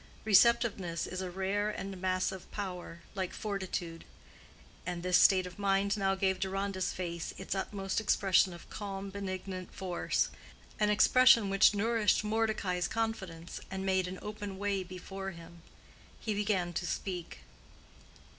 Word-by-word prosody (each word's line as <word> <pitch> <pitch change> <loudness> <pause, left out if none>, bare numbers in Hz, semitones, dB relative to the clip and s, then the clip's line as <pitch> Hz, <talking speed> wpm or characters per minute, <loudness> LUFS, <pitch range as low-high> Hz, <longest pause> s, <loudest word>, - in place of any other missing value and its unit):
Receptiveness 210 -5 +4
is 185 0 -4
a 185 - -3
rare 195 +3 -1
and 195 -3 -5
massive 185 0 -1
power, 180 -4 -6
like 190 -3 -3
fortitude; 185 -5 -4 0.8
and 175 -1 -4
this 180 0 +2
state 185 -2 +6
of 180 +2 -9
mind 200 0 +2
now 195 -2 +1
gave 190 -1 +1
Deronda's 195 -1 -1
face 170 -2 -4
its 190 - -4
utmost 195 +1 -2
expression 195 -3 +3
of 170 -1 -11
calm 195 -1 -5
benignant 185 -1 -5
force—an 190 +3 -2
expression 230 0 +6
which 195 +1 +5
nourished 220 0 +2
Mordecai's 215 -5 0
confidence 190 -7 -3
and 190 0 -4
made 190 -1 +2
an 185 +1 -5
open 205 -2 -5
way 200 -1 0
before 190 +1 -6
him. 170 -1 -12 0.6
He 220 - -2
began 200 -4 0
to 175 - -2
speak. 180 -2 -4
195 Hz, 135 wpm, -32 LUFS, 180-205 Hz, 0.8 s, state